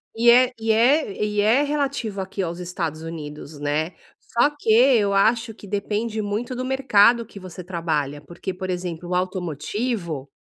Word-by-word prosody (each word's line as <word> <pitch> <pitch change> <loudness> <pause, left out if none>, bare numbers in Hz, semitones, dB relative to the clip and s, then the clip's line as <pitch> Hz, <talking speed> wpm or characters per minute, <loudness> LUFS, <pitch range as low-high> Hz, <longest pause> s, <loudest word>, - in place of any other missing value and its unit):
E 235 +1 +4
é 250 +1 +6
e 225 0 +1
é 235 0 +3
e 210 0 0
é 225 +7 +4
relativo 280 -8 -2
aqui 190 +1 -4
aos 170 0 -4
Estados 170 -3 -4
Unidos, 150 -2 -8
né. 150 +4 -1 0.3
Só 240 +5 +2
que 220 - +1
eu 230 -4 +5
acho 225 +3 +2
que 210 - -13
depende 210 +2 -2
muito 215 +5 -3
do 255 +1 -3
mercado 235 -3 +4
que 205 - -12
você 185 -1 -9
trabalha, 155 -5 -2
porque, 175 +5 -6
por 185 +1 -6
exemplo, 175 -1 -4
o 180 - 0
automotivo 180 - -3
200 Hz, 165 wpm, -23 LUFS, 170-235 Hz, 0.3 s, é